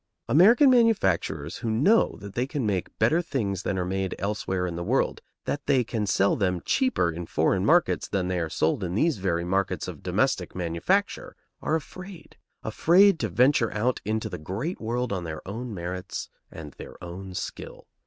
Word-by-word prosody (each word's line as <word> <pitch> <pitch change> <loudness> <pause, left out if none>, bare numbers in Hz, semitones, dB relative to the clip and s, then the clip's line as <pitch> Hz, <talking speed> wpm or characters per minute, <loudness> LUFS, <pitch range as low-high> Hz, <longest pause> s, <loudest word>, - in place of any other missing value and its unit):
American 230 - +6
manufacturers 95 - +2
who 115 - -4
know 145 - +3
that 100 0 -9
they 125 +2 -1
can 135 -3 -3
make 95 -4 -2
better 155 +11 +3
things 105 - -2
than 95 - -2
are 90 - -1
made 95 0 -2
elsewhere 95 -2 -2
in 85 -2 -4
the 85 - -4
world, 125 +9 0 0.2
that 145 - -3
they 135 -3 +3
can 110 -2 -3
sell 100 +1 +2
them 90 -3 0
cheaper 255 - +1
in 85 +1 -6
foreign 90 +4 +1
markets 170 - +3
than 95 -3 -1
they 90 -1 -1
are 80 -2 -2
sold 80 +5 0
in 90 0 -3
these 155 0 +1
very 85 -3 0
markets 95 +2 -1
of - - -8
domestic - - 0
manufacture, 85 -2 -1 0.3
are 155 - 0
afraid, 185 +3 -8 0.3
afraid 185 +1 +4
to 110 - -1
venture 120 +4 +3
out 120 +4 0
into 110 +1 -2
the - - -6
great 105 - -4
world 120 0 -2
on 90 -2 -3
their 80 0 -7
own 115 +5 -5
merits 90 -1 -5 0.2
and 75 -2 -9
their - - -9
own 90 +2 -8
skill. - - -7
100 Hz, 185 wpm, -26 LUFS, 90-135 Hz, 0.3 s, American